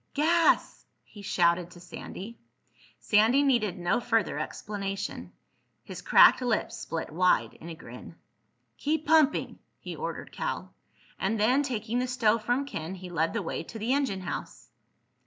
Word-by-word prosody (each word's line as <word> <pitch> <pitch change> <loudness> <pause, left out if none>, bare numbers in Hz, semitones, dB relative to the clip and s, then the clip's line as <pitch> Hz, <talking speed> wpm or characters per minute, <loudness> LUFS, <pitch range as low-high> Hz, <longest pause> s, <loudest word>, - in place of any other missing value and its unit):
"Gas!" 330 +3 +2 0.2
he 205 - -14
shouted 175 -2 +1
to 175 - -14
Sandy. 190 +5 -9 0.6
Sandy 225 +7 +4
needed 235 -9 +1
no 175 +5 +1
further 230 -2 0
explanation. 200 -1 -5 0.5
His - - -8
cracked - - +6
lips 240 -4 -1
split 165 -1 -5
wide 180 +3 +2
in 165 - -11
a 165 - -7
grin. 125 +1 -11 0.6
"Keep 310 +2 -1
pumping!" 310 -2 +3 0.2
he - - -7
ordered - - -5
Cal. - - -4 0.5
And 210 +3 0
then, 250 +7 +4
taking 240 -3 -2
the 255 - -1
stove 230 -3 +1
from 245 +5 0
Ken, 175 - -5
he 185 -1 -9
led 165 -1 0
the 230 -3 -2
way - - -3
to 195 +7 -9
the 225 +4 0
engine 270 -9 0
house. 180 - -7
215 Hz, 150 wpm, -28 LUFS, 180-255 Hz, 0.6 s, cracked